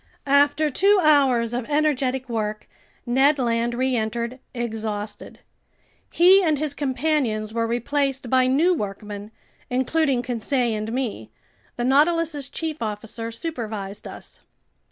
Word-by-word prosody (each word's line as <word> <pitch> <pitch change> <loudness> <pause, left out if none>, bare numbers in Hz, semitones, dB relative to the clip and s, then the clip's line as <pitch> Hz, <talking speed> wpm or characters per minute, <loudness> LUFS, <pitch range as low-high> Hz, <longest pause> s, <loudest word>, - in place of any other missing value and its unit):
After 285 +2 +3
two 400 +8 +4
hours 265 -6 +4
of 245 -1 -2
energetic 270 -3 0
work, 215 -2 -3 0.4
Ned 270 +4 +3
Land 235 -1 0
reentered, 240 -1 -1
exhausted. 220 -3 -5 0.7
He 370 +3 +6
and 315 -5 +2
his 300 0 -2
companions 260 -6 -1
were 230 0 0
replaced 270 +3 -1
by 255 +1 +3
new 310 +8 +3
workmen, 205 - -5 0.4
including 260 0 +1
Conseil 245 0 0
and 215 +1 -4
me. 230 - -3 0.5
The 240 - -2
Nautilus's 300 +1 +2
chief 315 -3 -4
officer 225 +1 -4
supervised 220 -7 -5
us. - - -10
255 Hz, 115 wpm, -23 LUFS, 225-290 Hz, 0.7 s, He